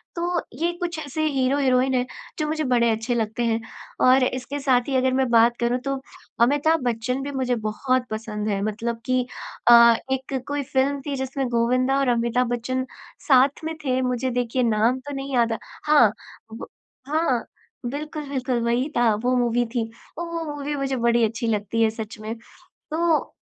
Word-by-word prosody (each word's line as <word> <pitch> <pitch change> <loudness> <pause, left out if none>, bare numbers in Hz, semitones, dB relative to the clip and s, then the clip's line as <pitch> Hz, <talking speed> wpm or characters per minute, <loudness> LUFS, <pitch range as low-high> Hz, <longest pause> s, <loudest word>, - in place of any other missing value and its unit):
तो 345 0 -1 0.2
ये 345 +1 +2
कुछ 345 -1 -3
ऐसे 310 +1 -3
हीरो-हीरोइन 265 -2 +2
है 250 -1 +1 0.3
जो 305 - 0
मुझे 310 0 -1
बड़े 240 -3 +3
अच्छे 225 +2 -1
लगते 225 +1 -1
हैं 225 0 +1 0.5
और 255 +1 +6
इसके 255 +3 -2
साथ 255 -2 +2
ही 270 - -1
अगर 260 0 +2
मैं 260 -1 +1
बात 235 +1 +5
करूँ 240 +1 +1
तो 275 0 0 0.5
अमिताभ 290 +5 +3
बच्‍चन 245 +3 -1
भी 285 - -4
मुझे 255 -2 0
बहुत 255 +3 0
पसंद 215 -1 -4
है 200 -1 -1
मतलब 225 +2 -3
कि 255 -1 +1 0.4
अ, 235 -1 +8 0.2
एक 265 0 -3
कोई 285 0 -2
फ़िल्म 275 +2 0
थी 285 -2 -2
जिसमें 265 0 -2
गोविंदा 255 +3 +2
और 275 - +1
अमिताभ 235 +1 +1
बच्चन 255 +2 -2 0.4
साथ 275 +1 +4
में 320 - -3
थे 255 -1 +1
मुझे 250 0 -1
देखिए 245 +1 0
नाम 230 +2 +2
तो 285 +2 -8
नहीं 275 0 -5
याद 230 -2 +2 0.3
हाँ, 290 -8 +5 0.4
ब 225 - -7 0.4
हाँ, 295 -5 +1 0.4
बिल्कुल, 295 +3 -5
बिल्कुल, 255 -3 -1
वही 245 +5 +1
था 240 -2 +4
वो 255 +1 +2
मूवी 240 0 +1
थी 225 -2 -1 0.3
औ 340 - -3
वो 335 -1 -4
मूवी 290 +1 -3
मुझे 275 -1 -1
बड़ी 235 -1 +2
अच्छी 225 +2 -3
लगती 215 +1 -1
है 220 - +4
सच 220 0 -7
में। 215 +1 -5 0.4
तो 325 0 -1
255 Hz, 180 wpm, -23 LUFS, 235-275 Hz, 0.5 s, अ